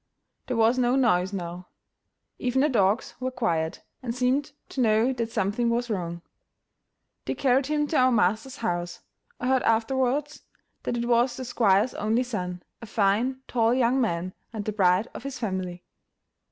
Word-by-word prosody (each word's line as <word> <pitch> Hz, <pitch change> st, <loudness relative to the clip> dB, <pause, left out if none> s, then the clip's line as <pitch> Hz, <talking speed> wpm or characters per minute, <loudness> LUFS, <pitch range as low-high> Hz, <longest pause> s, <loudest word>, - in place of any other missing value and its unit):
There 250 Hz, -, -1 dB
was 230 Hz, +3 st, +4 dB
no 245 Hz, 0 st, +3 dB
noise 190 Hz, -8 st, +2 dB
now; 180 Hz, -2 st, -6 dB, 0.7 s
even 255 Hz, +1 st, +1 dB
the 300 Hz, -, +3 dB
dogs 210 Hz, -2 st, +1 dB
were 255 Hz, 0 st, -1 dB
quiet, 170 Hz, -11 st, -1 dB, 0.2 s
and 240 Hz, -2 st, -4 dB
seemed 260 Hz, +4 st, +1 dB, 0.2 s
to 265 Hz, -, -2 dB
know 225 Hz, +2 st, +3 dB
that 230 Hz, -2 st, -3 dB
something 215 Hz, +5 st, 0 dB
was 235 Hz, 0 st, -1 dB
wrong. 170 Hz, -3 st, -3 dB, 1.0 s
They -, -, -2 dB
carried 265 Hz, 0 st, +2 dB
him 300 Hz, 0 st, +1 dB
to 315 Hz, -, +1 dB
our 255 Hz, 0 st, +5 dB
master's 220 Hz, +4 st, +1 dB
house. 175 Hz, -4 st, -3 dB, 0.4 s
I -, -, -4 dB
heard 260 Hz, -1 st, +3 dB
afterwards 260 Hz, +6 st, 0 dB, 0.4 s
that 240 Hz, -, -2 dB
it 235 Hz, -, -1 dB
was 240 Hz, +1 st, +2 dB
the 260 Hz, -, -5 dB
squire's 220 Hz, -2 st, +2 dB
only 225 Hz, +4 st, +1 dB
son, 180 Hz, -7 st, -4 dB, 0.2 s
a 230 Hz, -, -8 dB
fine, 220 Hz, +6 st, +1 dB
tall 230 Hz, 0 st, +2 dB
young 255 Hz, +1 st, +2 dB
man, 185 Hz, -5 st, -1 dB, 0.2 s
and 215 Hz, -3 st, -5 dB
the 215 Hz, -, -2 dB
pride 190 Hz, +1 st, +3 dB
of -, -, -7 dB
his 275 Hz, +1 st, -6 dB
family. 185 Hz, -5 st, -4 dB
230 Hz, 165 wpm, -26 LUFS, 195-255 Hz, 1.0 s, our